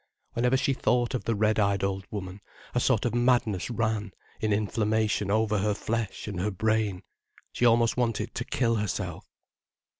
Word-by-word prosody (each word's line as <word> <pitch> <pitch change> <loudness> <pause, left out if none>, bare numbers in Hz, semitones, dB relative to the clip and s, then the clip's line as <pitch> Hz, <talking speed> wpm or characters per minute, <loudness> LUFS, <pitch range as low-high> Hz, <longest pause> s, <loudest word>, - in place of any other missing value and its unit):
Whenever 125 +2 +2
she 135 - +1
thought 125 -2 +1
of 130 - -3
the 115 - +1
red 110 +1 +2
eyed 100 -1 +2
old 95 -2 -2
woman, 100 -1 -6 0.3
a 125 - +2
sort 120 -3 +2
of 120 - 0
madness 120 -6 +2
ran 110 -3 -1 0.3
in 110 - 0
inflammation 105 0 +1
over 105 0 +2
her 105 +1 +1
flesh 110 -1 -3
and 100 -4 -4
her 100 +4 0
brain, 105 -1 0 0.5
she 120 - 0
almost 115 0 +3
wanted 115 -3 -1
to 125 - -3
kill 115 -2 0
herself. 105 -3 -3
110 Hz, 170 wpm, -27 LUFS, 100-115 Hz, 0.5 s, almost